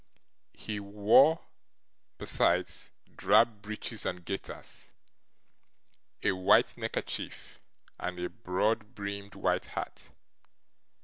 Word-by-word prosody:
He 105 -2 -5
wore, 105 +10 +5 0.8
besides, - - +1 0.3
drab 110 -3 +4
breeches 105 +1 -6
and 90 -1 -3
gaiters, 95 - -7 1.3
a 105 - +4
white 95 -1 +4
neckerchief, - - -5 0.4
and 90 0 -4
a 90 - -2
broad 105 +5 -1
brimmed 100 -1 -5
white - - 0
hat. - - -6
100 Hz, 85 wpm, -31 LUFS, 95-105 Hz, 1.3 s, wore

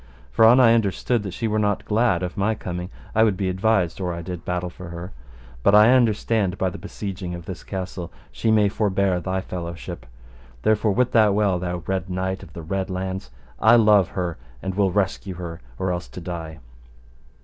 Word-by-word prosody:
For 110 - +5
an 120 +3 +7
I 115 -3 +7
understood 115 +2 +1
that 95 -3 -6
she 115 - -1
were 110 0 0
not 105 -1 0
glad 105 -5 +2
of 90 - -4
my 105 +3 +1
coming, 90 -2 -5 0.2
I 110 - +4
would 105 -4 +2
be 95 -1 -1
advised 95 -2 +1
or 90 -1 -1
I 85 - -6
did 90 -1 -6
battle 90 0 -2
for 90 0 -10
her. 85 +2 -7 0.5
But 100 - +5
I 105 +3 +8
understand 110 -5 +2
by 95 -1 0
the - - -8
besieging 95 -2 -5
of 85 -1 -9
this 95 -1 -7
castle 90 -3 -5 0.2
she 115 - -1
may 105 -2 +5
forbear 100 -3 +1
thy 95 +1 -2
fellowship. 85 -9 -7
And - - -23
therefore 110 -1 +2
wit 125 +3 +2
thou 110 -3 +5
well, 100 -3 +2
thou 90 -1 -4
Red 95 -1 -2
Knight 95 +1 -2
of - - -13
the 85 - -8
Red 95 +3 -2
Launds, 95 -4 -4 0.3
I - - +6
love 105 -5 +5
her, 85 -5 -2 0.2
and 95 +7 -4
will 95 -1 +2
rescue 95 -1 -1
her, 85 -2 -7 0.2
or 95 +5 -1
else 85 -1 -3
to - - -9
die. 85 -2 -6
95 Hz, 205 wpm, -23 LUFS, 90-105 Hz, 0.5 s, I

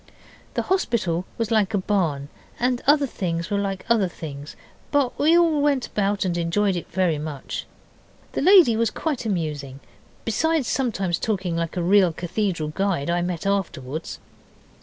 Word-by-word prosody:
The - - 0
hospital 220 - 0
was 230 -1 -2
like 215 -2 +2
a - - +3
barn, 170 -8 0 0.3
and 245 0 +1
other 290 0 +5
things 170 -8 -3
were 200 - +1
like 195 -1 -3
other 225 -5 +3
things, 145 -4 -8 0.3
but 285 -4 +1
we 320 +4 +5
went 295 -6 +3
all - - -14
about 200 -1 0
and 175 -2 0
enjoyed 180 +4 +1
it 175 - -5
very 170 -4 +1
much. 150 -3 -5 0.6
The - - -2
lady 350 - +7
was 230 0 +2
quite 280 -5 -3
amusing, 150 -8 -3 0.5
besides 310 +5 +1
sometimes 195 -9 0
talking 190 -6 -1
like 170 +2 -3
a 175 - 0
real 190 0 +5
cathedral 175 -2 -2
guide 170 -3 -1
I 175 0 +1
met 175 -1 -3
afterwards. 165 -7 -2
195 Hz, 160 wpm, -23 LUFS, 170-235 Hz, 0.6 s, lady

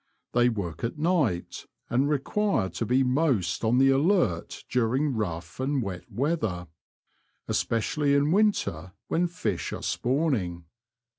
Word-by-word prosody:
They 120 0 +4
work 90 -8 -4
at 115 +5 -2
night, 150 - 0 0.2
and 135 +4 +1
require 150 - 0
to 115 - -3
be 130 +2 +3
most 125 - +1
on 115 +2 +3
the 135 +1 +5
alert 135 - +1
during 130 +4 +1
rough 85 -6 -4
and 135 +2 0
wet 90 -3 -7
weather; 120 - -1 0.8
especially 140 +6 +1
in 145 +2 +2
winter 175 - +1 0.2
when 175 +2 +2
fish 110 - -3
are - - -6
spawning. 120 - -1
125 Hz, 130 wpm, -27 LUFS, 95-150 Hz, 0.8 s, the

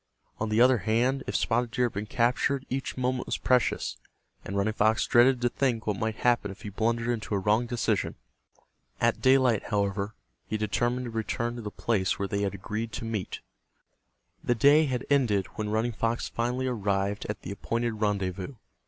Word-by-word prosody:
On 110 - -1
the 110 +1 +2
other 125 0 +6
hand 120 +7 +1
if - - -3
Spotted 120 0 +1
Deer 125 +2 +1
had 120 - -2
been 105 +2 -4
captured 130 +3 +1
each 135 0 -3
moment 125 0 -1
was - - -1
precious, 125 -1 +1 0.5
and 100 - -4
Running 105 +2 +1
Fox 110 +1 +2
dreaded 125 +1 +4
to 120 - +2
think 120 -4 0
what 105 -2 -1
might 110 -1 -1
happen 120 -3 +1
if 95 +3 -10
he 105 - -5
blundered 115 +3 0
into 110 -3 -1
a - - +2
wrong 105 +5 +2
decision. 120 -1 0 0.8
At - - +1
daylight, 130 -5 +4
however, 100 0 -1 0.3
he 110 - -1
determined 120 +4 0
to 120 - -5
return 115 +1 -2
to - - -5
the 105 - -5
place 100 -3 0
where 100 - -2
they 100 +1 -2
had 100 -1 -1
agreed 110 +4 -4
to 115 - -4
meet. 110 -5 -4 1.0
The 120 - +2
day 145 +6 +6
had 130 -2 -2
ended 115 -9 +3
when 105 -1 -3
Running 110 +3 0
Fox 115 +1 -1
finally 125 +2 -1
arrived 100 -4 -1
at 105 - -5
the 90 - -5
appointed 115 +3 -2
rendezvous. 100 +2 -1
115 Hz, 190 wpm, -28 LUFS, 105-125 Hz, 1.0 s, other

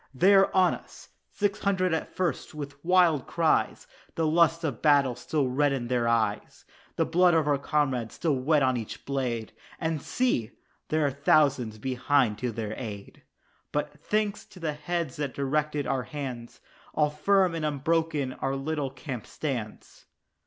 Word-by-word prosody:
They 185 +10 +5
are 195 0 +5
on 185 -2 +4
us! - - -11 0.2
Six 205 0 -1
hundred 185 -4 +1
at 160 - -3
first, 175 -3 -2
with 140 -1 -8
wild 175 -5 +3
cries 165 -2 +1 0.3
The 165 - 0
lust 165 +1 +3
of 150 -4 0
the - - -27
battle 140 -4 +4
still 135 +3 -1
red 140 +3 +2
in 125 -3 -3
their 120 -2 +1
eyes 110 -3 -1 0.3
The - - +1
blood 175 +1 +4
of 160 -2 +2
our 145 -2 +2
comrades 135 -6 -1
still 165 -3 0
wet 145 +3 +2
on 130 -1 +2
each 110 -3 -7
blade, 125 -5 -2 0.3
And 160 -3 -1
see! 125 - 0 0.3
there 155 -1 +1
come 140 +2 -17
thousands 135 -7 +3
behind 130 -1 +1
to 125 -1 -2
their 110 -1 -4
aid 105 -5 -8 0.5
But, 150 0 -3
thanks 210 -1 -1
to 185 - -15
the 160 -3 -2
heads 155 -1 -3
that 145 -3 -3
directed 145 +1 -1
our 135 -1 0
hands, 125 -3 -7 0.3
All 150 -1 +2
firm 190 +3 +2
and 165 -1 -3
unbroken 150 -2 0
our 135 +1 -2
little 145 0 -2
camp 130 -3 -7
stands. 125 -8 -5
145 Hz, 165 wpm, -27 LUFS, 130-165 Hz, 0.5 s, They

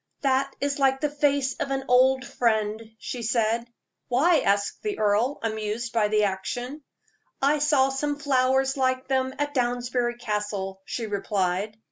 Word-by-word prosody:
"That 275 0 +1
is 285 +1 -1
like 270 -1 +3
the 300 0 -1
face 285 -2 +1
of 275 - -3
an 270 0 -1
old 260 +1 +4
friend," 220 -2 0 0.2
she 245 +2 -6
said. 230 0 0 0.4
"Why?" 300 +7 +4
asked 200 -2 0
the 420 -2 -3
earl, 215 +6 +2
amused 220 +1 -3
by 220 -2 +3
the 210 0 +2
action. 245 +9 -3 0.6
"I 290 +2 +2
saw 290 -2 +3
some 290 +2 -2
flowers 265 -1 +2
like 260 -1 0
them 260 0 0
at 290 0 -2
Downsbury 245 -1 0
Castle," 205 -4 -3
she 235 - -4
replied. 200 0 -1
250 Hz, 150 wpm, -25 LUFS, 215-270 Hz, 0.6 s, old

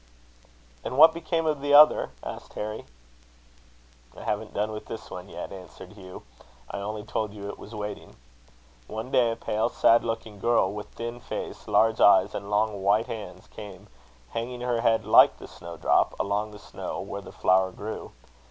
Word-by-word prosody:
"And 130 - -4
what 160 +2 +9
became 165 0 -2
of 150 -3 0
the 145 0 +3
other?" 150 +1 +7
asked - - -8
Harry. 105 +1 -5 1.3
"I - - -9
haven't - - -2
done 105 +2 0
with 105 0 -7
this 110 - -8
one 90 +2 -8
yet," - - -7
answered 95 +1 -11
Hugh. 95 -3 -11 0.5
"I - - -4
only 105 +1 -5
told 105 -1 -3
you 100 -1 -7
it - - -8
was 110 - -10
waiting. 105 -1 -6 0.7
One 110 +4 -6
day 120 -3 +3
a - - -3
pale, 110 -1 -1
sad 115 - +4
looking 115 -2 -4
girl, 115 -2 +2
with 105 0 -6
thin 120 +1 -6
face, - - -6
large 110 0 +3
eyes, 100 0 +6
and 100 0 -5
long 105 -1 0
white 105 +4 +3
hands, 110 -2 -8
came, 100 -1 -11 0.4
hanging 120 +2 -4
her 120 -2 0
head 115 -1 +2
like - - +7
the - - -11
snowdrop, 85 0 0
along 105 +2 -1
the 105 - -11
snow - - -7
where - - -6
the - - -11
flower 95 0 +3
grew. 110 +3 -7
110 Hz, 175 wpm, -26 LUFS, 100-115 Hz, 1.3 s, what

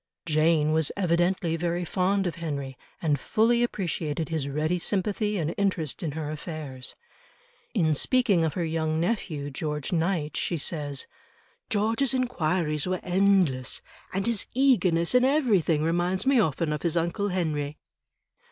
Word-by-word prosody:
Jane 155 -1 +3
was 160 -1 +2
evidently 175 -1 +1
very 175 +1 -1
fond 195 +3 +1
of 175 - -1
Henry, 140 -5 -4 0.3
and 150 -4 +2
fully 230 - +2
appreciated 165 -8 -2
his 155 -4 -2
ready 155 +5 0
sympathy 205 +3 0
and 165 -2 -1
interest 185 -5 0
in 160 -5 -3
her 155 -1 -4
affairs. 150 -5 -6 0.8
In 160 -7 +3
speaking 210 - +3
of 160 -2 -1
her 175 - -1
young 160 -1 -1
nephew 165 -7 -2
George 150 +1 -3
Knight, 165 -3 0
she 170 - -1
says: 145 -3 -2 0.6
"George's 225 +5 +1
enquiries 175 - 0
were 185 0 -1
endless, 180 -8 +2 0.3
and 195 +1 -1
his 230 -4 0
eagerness 195 -11 +3
in 250 0 +5
everything 215 - +2
reminds 175 +4 0
me 270 -2 +4
often 160 -4 +1
of 150 - -3
his 170 -1 0
uncle 170 +5 0
Henry." 150 -5 -2
170 Hz, 145 wpm, -27 LUFS, 155-195 Hz, 0.8 s, in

